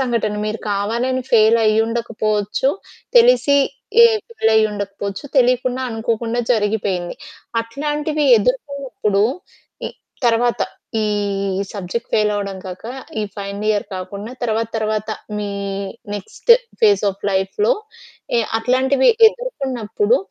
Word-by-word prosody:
సంఘటన 235 -5 0
మీరు 215 +1 -3
కావాలని 235 +6 -1
ఫెయిలయ్యుండకపోవచ్చు, 220 +1 +2 0.5
తెలిసి 465 -12 +5 0.5
ఎ - - +9 0.2
ఫెయిలయ్యుండకపోవచ్చు, 210 - 0
తెలియకుండా 255 +1 +2
అనుకోకుండా 230 +1 -1
జరిగిపోయింది. 205 -5 -1 0.5
అట్లాంటివి 295 +5 -2
ఎదుర్కున్నప్పుడు 250 -4 -1 0.6
ఈ - - -2 0.4
తరువాత 235 +1 +2 0.4
ఈ - - +1 0.6
సబ్జెక్ట్ 205 +4 -5
ఫెయిలవ్వడం 205 -2 0
కాక 180 +2 -8 0.4
ఈ - - 0
ఫైనల్ 200 +1 -5
ఇయర్ 210 -1 +1
కాకుండా 200 +4 -6
తరువాత 225 -1 0
తరువాత 215 0 -1 0.3
మీ 205 - -3 0.7
నెక్స్ట్ 205 - -4 0.3
ఫేస్ 415 - +4
ఆఫ్ 195 +1 -14
లైఫ్‌లో 195 - +1 0.6
ఎ - - +4 0.2
అట్లాంటివి 260 +3 +2 0.2
ఎదుర్కున్నప్పుడు 415 - -1
225 Hz, 95 wpm, -19 LUFS, 205-260 Hz, 0.7 s, ఎ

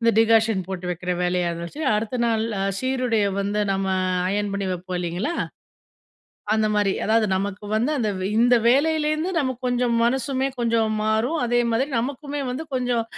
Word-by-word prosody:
இந்த 230 0 +4
டிகாஷன் 225 -4 +3
போட்டு 185 -1 -5
வெக்கிற 180 +1 -2
வேலைய 180 -1 +1
வச்சு. 170 - -7
அடுத்த 225 +3 -2
நாள் 225 -1 +1 0.3
சீருடைய 255 -5 +1
வந்து 205 +1 -1
நம்ம 195 0 -1 0.4
அயன் 205 +1 -1
பண்ணி 200 -1 -2
வெப்போம், 180 0 -4
இல்லைங்களா? 180 - -2 1.2
அந்த 220 0 +2
மாரி. 205 -2 +2
அதாவது 220 0 +3
நமக்கு 200 +2 -3
வந்து 235 +7 +1
அந்த 215 -4 0 0.3
இந்த 245 +1 +5
வேலையிலேருந்து 310 +5 +2
நமக்கு 260 -4 -2
கொஞ்சம் 245 -1 +1
மனசுமே 265 +2 0
கொஞ்சம் 230 -2 +1
மாறும், 220 +9 +1
அதே 240 0 +2
மாதிரி 260 +5 +1
நமக்குமே 285 +3 -4
வந்து 260 +6 -4
கொஞ்சம் 245 -2 0
225 Hz, 150 wpm, -23 LUFS, 200-255 Hz, 1.2 s, இந்த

